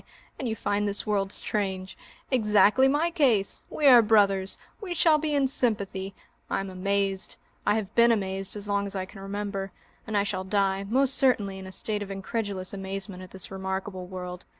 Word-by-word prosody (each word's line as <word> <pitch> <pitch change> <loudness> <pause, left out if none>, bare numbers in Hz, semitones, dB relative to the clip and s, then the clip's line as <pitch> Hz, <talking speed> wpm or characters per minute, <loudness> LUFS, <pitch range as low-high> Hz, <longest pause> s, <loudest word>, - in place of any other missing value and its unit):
And 260 - -2
you 220 - -2
find 205 -1 -1
this 200 0 -1
world 200 -2 0
strange! 190 -3 -3 0.4
Exactly 215 +1 +5
my 300 +5 +1
case! 245 - +2
We 300 - -2
are 250 -4 +9
brothers! 200 -3 +3 0.2
We 365 -4 -4
shall 315 -2 +5
be 300 -1 -1
in 280 -1 +3
sympathy. 200 -7 0 0.3
I - - 0
am 195 0 -5
amazed, 195 0 -1 0.3
I - - +4
have 215 -1 -3
been 235 0 +6
amazed 195 -2 -2
as 205 0 -4
long 200 0 0
as 200 - -5
I 190 -1 -2
can 195 +2 -13
remember, 195 0 -4 0.4
and 215 -1 0
I 200 - +3
shall 195 -2 -2
die, 195 0 0
most 260 +5 +2
certainly, 205 -8 +2
in 190 - -8
a - - -8
state 210 +2 -1
of 200 - -5
incredulous 195 -1 -3
amazement, 195 -1 -4
at 185 - -10
this 190 0 -6
remarkable 190 -1 -4
world. 180 -1 -7
200 Hz, 190 wpm, -27 LUFS, 190-220 Hz, 0.4 s, are